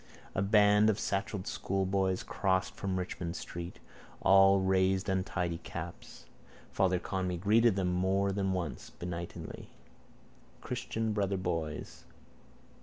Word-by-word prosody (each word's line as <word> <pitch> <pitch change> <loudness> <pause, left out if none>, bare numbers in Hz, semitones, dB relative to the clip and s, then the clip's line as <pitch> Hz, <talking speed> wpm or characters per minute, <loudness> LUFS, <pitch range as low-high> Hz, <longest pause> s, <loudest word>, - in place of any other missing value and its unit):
A - - 0
band 105 +1 +5
of 110 -1 +1
satchelled 100 -1 -2
schoolboys 95 -1 0
crossed 95 -1 0
from 95 -1 -2
Richmond 90 -1 -4
street. 85 0 -6 0.4
All 95 0 +6
raised 95 +1 +2
untidy 90 -3 -1
caps. 85 0 -8 0.5
Father 95 -1 +2
Conmee 90 -1 -2
greeted 110 +4 +4
them 90 -2 0
more 95 +2 +1
than 95 -1 0
once 90 -6 -3
benignly. 85 -1 -7 0.9
Christian 115 -3 -3
brother 100 -2 0
boys. 85 -5 -4
95 Hz, 110 wpm, -31 LUFS, 90-100 Hz, 0.9 s, All